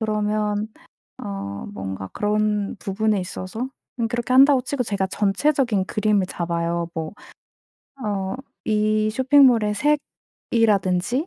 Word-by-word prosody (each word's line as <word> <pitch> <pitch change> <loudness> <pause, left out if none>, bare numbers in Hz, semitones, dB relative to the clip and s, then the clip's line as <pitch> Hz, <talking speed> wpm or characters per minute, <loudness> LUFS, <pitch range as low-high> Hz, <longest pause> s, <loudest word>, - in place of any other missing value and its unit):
그러면 210 -1 -1 0.6
어 100 0 -5
뭔가 95 -1 -5
그런 210 -1 0
부분에 210 +1 0
있어서 185 +6 -5 0.3
응 230 - +1
그렇게 240 +1 -2
한다고 270 0 +7
치고 260 0 -2
제가 200 -4 -1
전체적인 210 +2 +1
그림을 210 -1 +1
잡아요. 170 -1 -2
뭐 160 -1 -4 0.9
어 195 -2 -2 0.3
이 215 0 +1
쇼핑몰의 255 -4 +4
색이라든지 225 - 0
210 Hz, 250 characters per minute, -23 LUFS, 190-230 Hz, 0.9 s, 한다고